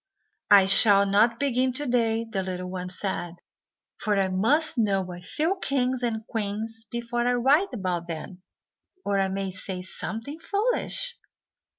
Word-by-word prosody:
"I 200 -2 +8
shall 200 +1 +6
not 215 +4 +3
begin 260 -2 +1
to 290 +3 +1
day," 230 -3 +1
the 210 -4 -2
little 180 -1 -5
one 180 -1 -5
said, 180 -2 -3 0.6
"for 210 -1 0
I 190 -1 +1
must 250 +13 +2
know 195 -6 0
a 175 - -10
few 320 - -2
kings 255 -2 0
and 225 -3 -2
queens 225 +1 -4
before 240 0 -2
I 245 - +3
write 275 +10 +3
about 180 -7 -3
them, 175 +3 -7 0.6
or 200 -1 +1
I 195 - +2
may 195 0 -3
say 185 0 -5
something 225 - -6
foolish." 485 +5 -1
220 Hz, 155 wpm, -26 LUFS, 190-250 Hz, 0.6 s, I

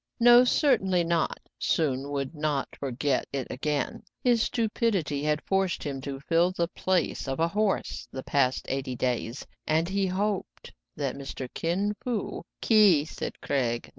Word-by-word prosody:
" - - -48
No, 240 +1 +9
certainly 215 - +3
not: 165 -1 0 0.2
Soun 140 -3 0
would 140 +1 -3
not 150 -3 -2
forget 135 0 -1
it 135 -2 -2
again. 145 +1 -2 0.2
His 240 -2 +4
stupidity 215 - 0
had 150 +1 0
forced 195 -2 0
him 135 -2 -4
to 135 0 -5
fill 170 +4 +2
the 170 -2 -1
piace 185 -7 -1
of 135 +1 -2
a 165 - +3
horse 210 +2 -1
the 130 - -6
past 130 -2 +1
eight 130 -2 -3
days, 120 0 -2 0.2
and 160 +2 +2
he 195 +1 0
hoped 195 +2 -3 0.2
that 140 -3 -2
Mr. 135 -1 -6
Kin 190 +5 0
Fo 240 -5 -3
" - - -60
— - - -56
"Ki"— 205 -10 +5
said - - -6
Craig. 120 -4 -1
155 Hz, 165 wpm, -27 LUFS, 135-195 Hz, 0.2 s, No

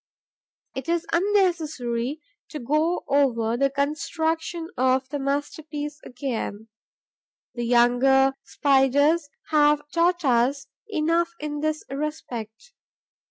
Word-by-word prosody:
It 265 +3 -6
is 340 -1 0
unnecessary 315 - 0 0.3
to 310 - -6
go 305 +7 0
over 240 -5 +2
the 275 +3 +2
construction 320 +4 -2
of 260 +1 +2
the 290 0 -3
masterpiece 295 +2 -3
again; 230 -4 -5 0.8
the 240 -1 -3
younger 250 +3 +4
Spiders 285 +3 +2 0.2
have 295 -1 +4
taught 345 0 +1
us 260 +2 +2 0.2
enough 335 -1 +1
in 295 0 -4
this 310 0 -1
respect. 275 - -6
290 Hz, 100 wpm, -24 LUFS, 260-320 Hz, 0.8 s, younger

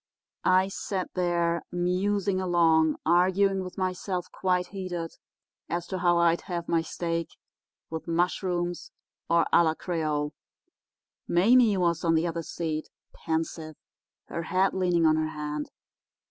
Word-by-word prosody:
"I 185 +1 +4
sat 190 -1 -4
there, 170 -2 +1
musing 185 +2 0
along, 165 -3 +3
arguing 190 +3 +3
with 185 0 -9
myself 185 -1 -3
quite 180 -1 0
heated 180 -4 -5 0.6
as 170 0 -2
to 190 - -3
how 175 -1 +3
I'd 170 0 +3
have 170 -1 -3
my 165 -1 +2
steak—with 165 -1 -6
mushrooms, 175 +1 -1 0.4
or 170 0 +4
à - - +7
la 160 -1 +1
créole. 155 -4 -2 1.0
Mame 215 +3 +4
was 170 -2 +1
on 165 -1 +3
the 160 +1 +2
other 170 -1 -2
seat, 155 -1 -4 0.2
pensive, 160 -1 -3 0.5
her 170 - -4
head 185 +4 +1
leaning 180 -3 +2
on 155 0 +4
her 155 0 0
hand. 150 -1 -4
175 Hz, 130 wpm, -27 LUFS, 165-185 Hz, 1.0 s, à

